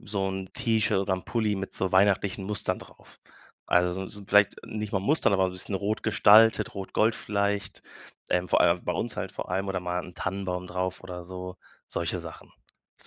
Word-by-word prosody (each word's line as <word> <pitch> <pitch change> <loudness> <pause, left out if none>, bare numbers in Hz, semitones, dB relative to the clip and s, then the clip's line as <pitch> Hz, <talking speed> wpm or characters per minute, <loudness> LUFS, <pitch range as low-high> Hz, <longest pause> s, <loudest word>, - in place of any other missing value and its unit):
so 100 -1 -2
'n 95 -1 -5
T-Shirt 110 -4 +1
oder 95 0 0
'n 90 - -7
Pulli 110 -3 0
mit 95 0 -5
so 95 -1 -1
weihnachtlichen 100 0 +3
Mustern 105 0 -1
drauf. - - -17 0.5
Also 90 0 +3
so 95 +1 -5
so 105 -1 -11
vielleicht 105 0 +4
nicht 105 0 -5
mal 95 - +2
Mustern, 140 +4 +2
aber 95 -1 +3
so 95 - 0
'n - - -10
bisschen 90 +2 -4
rot 105 +2 -2
gestaltet, 110 +1 +5
rot-gold 105 +3 +1
vielleicht, 100 -1 -2 0.5
ähm, 90 0 +1
vor - - +3
allem 85 +1 +3
bei - - 0
uns - - -3
halt - - -3
vor - - -6
allem 95 +2 -1
oder 95 -1 -1
mal 90 0 -3
'n 90 - -12
Tannenbaum 90 -2 -3
drauf 90 +1 -3
oder 90 -1 -7
so, 90 +1 -7 0.3
solche - - -2
Sachen. - - -9 0.5
Das - - -5
95 Hz, 200 wpm, -27 LUFS, 90-105 Hz, 0.5 s, gestaltet